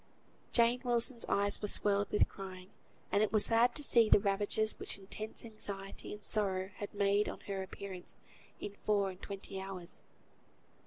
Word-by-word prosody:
Jane 235 +1 +4
Wilson's 240 0 +1
eyes 200 0 +2
were 210 - -1
swelled 200 0 +2
with 210 - +3
crying; 185 -1 -9 0.4
and 200 - +3
it 215 - +2
was 215 -1 +6
sad 235 +2 +4
to 295 - -2
see 230 -5 +5
the - - +8
ravages 205 +2 +1
which - - -5
intense 215 +4 -7
anxiety 200 -3 -6
and 210 0 -8
sorrow 190 -2 0
had 205 - -5
made 200 +1 +2
on - - -7
her 195 -2 -4
appearance 190 -1 -7 0.4
in 200 - -5
four 200 -2 +2
and 185 - -14
twenty 195 -1 -6
hours. 190 -3 -8
205 Hz, 165 wpm, -34 LUFS, 195-215 Hz, 0.4 s, the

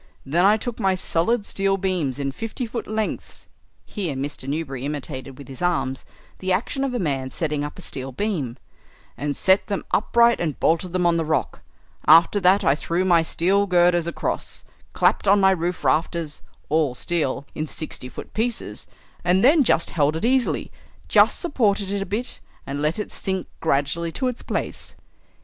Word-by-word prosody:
Then 170 +7 +2
I 210 +2 +5
took 235 +1 -5
my 190 -1 +2
solid 200 +5 0
steel 195 -1 0
beams 180 -9 -1
in 140 -1 -2
fifty 225 - -4
foot 230 0 -5
lengths," 215 0 -4 0.4
here 180 -10 -3
Mr. 135 0 -5
Newberry 140 -4 -3
imitated 135 -2 -5
with 140 - -11
his 135 -2 -8
arms 135 -7 0 0.3
the 185 0 -2
action 245 +8 0
of 265 -2 -1
a - - +1
man 135 - -1
setting 150 0 -2
up 145 - -6
a 185 - -9
steel 135 -3 -4
beam, 140 - -2 0.6
"and 145 -1 -3
set 190 +1 +3
them 200 -2 -3
upright 235 +2 +4
and 155 -4 -2
bolted 170 +2 +1
them 180 -1 +1
on 170 -1 +3
the 165 - +1
rock. 155 -5 -1 0.5
After 165 +6 +7
that 190 +1 +4
I 135 - +4
threw 170 +5 -1
my 170 -3 +5
steel 190 +5 +1
girders 175 -2 +3
across, 170 - -3 0.3
clapped - - +2
on 200 +1 +6
my 190 -1 +5
roof 175 -1 -2
rafters, 160 -1 0 0.3
all 150 -4 +1
steel, 140 -2 -1
in 155 0 -3
sixty 150 -5 -6
foot - - -10
pieces, 230 +1 -2 0.4
and 180 +4 +3
then 295 +2 +6
just 170 - +2
held 150 -1 +2
it 165 - -2
easily, 255 0 +1 0.4
just - - +5
supported 210 - +1
it 200 -1 -1
a 195 - -3
bit, 235 +5 -2 0.3
and 140 +1 -4
let 150 +2 0
it 210 - -4
sink 190 -1 -3
gradually 160 +3 0
to 260 - -1
its 250 - -7
place." - - -4
175 Hz, 180 wpm, -23 LUFS, 145-200 Hz, 0.6 s, After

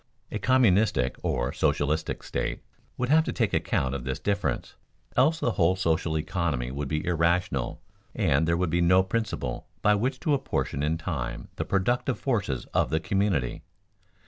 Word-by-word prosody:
A - - -2
communistic 110 - +3
or - - -1
socialistic 75 +2 0
state - - -3 0.3
would 125 0 -1
have 160 +2 +5
to - - -1
take 110 -5 0
account 65 0 0
of 70 -3 -4
this 65 +1 -2
difference, 100 0 -1 0.4
else 155 +6 +4
the 120 - +1
whole 90 -2 +3
social 80 -3 0
economy 75 -6 -1
would 70 +1 -3
be 75 +2 -2
irrational 85 -5 0 0.4
and 70 +4 +2
there 85 0 +2
would 90 -2 0
be 85 +1 +2
no 90 +2 +5
principle 95 - -3 0.2
by 105 - +5
which 125 +5 0
to 150 - +1
apportion 130 - -1
in 75 +2 +1
time 65 -8 -4
the - - -2
productive 120 +6 0
forces 100 - -1
of - - +2
the 80 - +1
community. 90 -8 0
85 Hz, 165 wpm, -27 LUFS, 75-105 Hz, 0.4 s, have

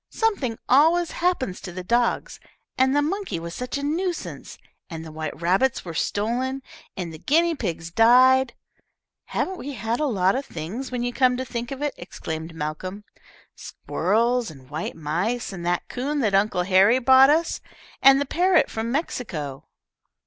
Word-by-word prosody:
Something 340 - -1
always 320 +6 +4
happened 335 - -1
to 185 - -8
the 185 +1 -6
dogs, 240 - 0 0.4
and 265 +1 +3
the 290 - +3
monkey 355 - -2
was 170 0 -7
such 250 +6 -4
a 280 - -5
nuisance, 345 +4 -3 0.3
and 165 -2 -7
the 160 - -9
white 155 0 -6
rabbits 190 +10 +1
were 170 - -6
stolen, 245 +10 -1 0.3
and 175 -3 -4
the 155 - -10
guinea 335 - +2
pigs 170 - -4
died." 250 +4 +5 0.7
"Haven't 375 0 -3
we 285 +2 -6
had 225 0 -2
a 305 - +1
lot 190 -6 +2
of 270 - -2
things, 210 - -6
when 245 -1 -2
you 245 0 -2
come 250 -1 +3
to 260 - -3
think 240 -1 -5
of 275 +1 -5
it?" 295 - -1
exclaimed 160 -2 -6
Malcolm. 160 +6 -5 0.5
"Squirrels, 235 +2 0
and 135 -3 -14
white 155 +2 -4
mice, 180 +10 -2
and 175 -2 -7
the 175 0 +1
coon 275 +4 -3
that 215 -5 +1
Uncle 195 -2 +2
Harry 195 +6 +5
brought 260 +1 +6
us, 325 +3 +1 0.4
and 270 0 +7
the 285 - 0
parrot 360 +4 +2
from 225 +1 -3
Mexico." 175 - -4
240 Hz, 170 wpm, -24 LUFS, 180-270 Hz, 0.7 s, and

